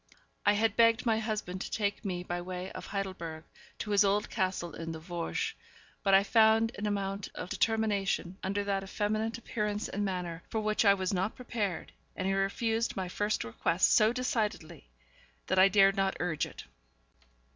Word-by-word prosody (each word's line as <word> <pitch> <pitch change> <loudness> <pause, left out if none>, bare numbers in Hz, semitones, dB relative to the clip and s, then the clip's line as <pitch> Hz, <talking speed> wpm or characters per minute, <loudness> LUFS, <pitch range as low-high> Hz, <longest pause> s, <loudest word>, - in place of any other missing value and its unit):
I 205 - +7
had 220 0 +1
begged 230 +1 +4
my 225 -2 +3
husband 210 -4 -3
to - - -4
take 205 -2 -1
me 180 -3 -3
by 175 0 -3
way 180 +1 -5
of - - -8
Heidelberg 185 -5 -4 0.3
to 210 - -4
his 205 0 +5
old 205 +1 +1
castle 185 -4 -1
in 165 0 -5
the 160 - -6
Vosges; 175 - -3 0.5
but 195 -2 +4
I 195 - +6
found 225 +1 +4
an 210 - -1
amount 200 -1 -2
of 180 - -6
determination, 205 -3 0
under 200 +2 -1
that 200 -1 0
effeminate 215 +3 -1
appearance 210 -2 -2
and 205 - -3
manner, 180 -4 -3
for 220 - -1
which 215 +1 +1
I 200 0 +7
was 190 0 -2
not 190 +3 -1
prepared, 215 -8 -3 0.2
and 185 - -3
he 195 - +1
refused 225 +4 0
my 185 -1 -2
first 205 +4 -1
request 165 +10 +1
so 215 0 +5
decidedly 215 - -2 0.6
that 190 - +1
I 190 - +8
dared 195 0 +5
not 195 -1 0
urge 170 -4 -1
it. - - -10
200 Hz, 180 wpm, -31 LUFS, 185-215 Hz, 0.6 s, I